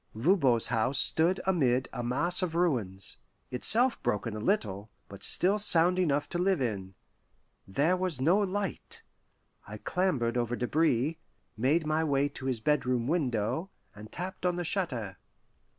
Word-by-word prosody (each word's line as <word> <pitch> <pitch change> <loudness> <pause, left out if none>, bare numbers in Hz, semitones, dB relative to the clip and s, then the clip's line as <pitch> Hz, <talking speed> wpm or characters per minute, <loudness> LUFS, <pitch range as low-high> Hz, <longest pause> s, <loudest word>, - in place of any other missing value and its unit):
Voban's 130 - +2
house 115 +3 0
stood 170 +4 +3
amid 130 -9 +1
a 120 - -4
mass 170 +10 +2
of 175 -3 -3
ruins, 115 - -1 0.3
itself 235 - +3
broken 105 +1 -2
a - - -5
little, 105 - -2 0.2
but 100 0 -12
still 195 +4 +4
sound 180 -2 +6
enough 145 -5 0
to 175 - -4
live 185 -1 +1
in. 100 -7 -4 0.7
There 145 - +1
was 180 -6 -1
no 170 +10 +2
light. 205 - -4 0.6
I - - -8
clambered 140 -11 -1
over 120 0 -1
debris, 150 +3 0 0.4
made 140 +9 0
my 155 +1 0
way 145 -2 0
to 135 -2 -8
his 125 -3 -2
bedroom 125 -2 0
window, 145 - -2 0.2
and 105 +1 -13
tapped 180 +2 -7
on 180 -1 0
the 175 - -3
shutter. 125 - -3
145 Hz, 150 wpm, -28 LUFS, 120-180 Hz, 0.7 s, sound